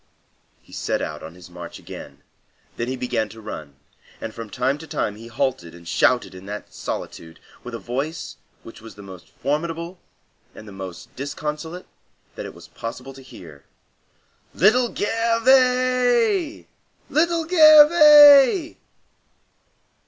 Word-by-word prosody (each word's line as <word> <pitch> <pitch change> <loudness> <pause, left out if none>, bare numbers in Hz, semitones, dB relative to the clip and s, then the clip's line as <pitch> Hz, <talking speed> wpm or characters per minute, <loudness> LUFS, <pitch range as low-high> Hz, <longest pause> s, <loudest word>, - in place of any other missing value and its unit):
He - - -20
set - - -2
out - - -6
on 80 +2 -10
his 90 -2 -14
march - - -10
again, 70 0 -12 0.5
then 115 - -4
he 130 - -3
began 120 -4 -2
to 110 - -13
run; 80 -10 -9 0.4
and 110 - -7
from 115 -1 -9
time 130 +7 -1
to 160 - -11
time 105 - -3
he 115 +2 -12
halted 120 -9 -3
and 85 0 -15
shouted 120 -1 +1
into 95 +1 -12
that 105 +1 -8
solitude, 80 0 -7 0.2
with 125 -1 -7
a - - -4
voice 140 +8 -5 0.3
which 115 - -13
was 115 0 -13
the 100 - -12
most 95 -3 -13
formidable 165 +5 -4 0.6
and 110 - -12
the - - -10
most 95 -3 -10
disconsolate 150 +5 -6 0.5
that - - -7
it - - -12
was - - -14
possible 125 +4 -8
to 135 - -14
hear, 80 - -14 0.9
"Little 240 +6 +3
Gervais! 250 - +1 0.5
Little 330 +1 +1
Gervais!" 305 -2 +7
140 Hz, 135 wpm, -22 LUFS, -, 0.9 s, Gervais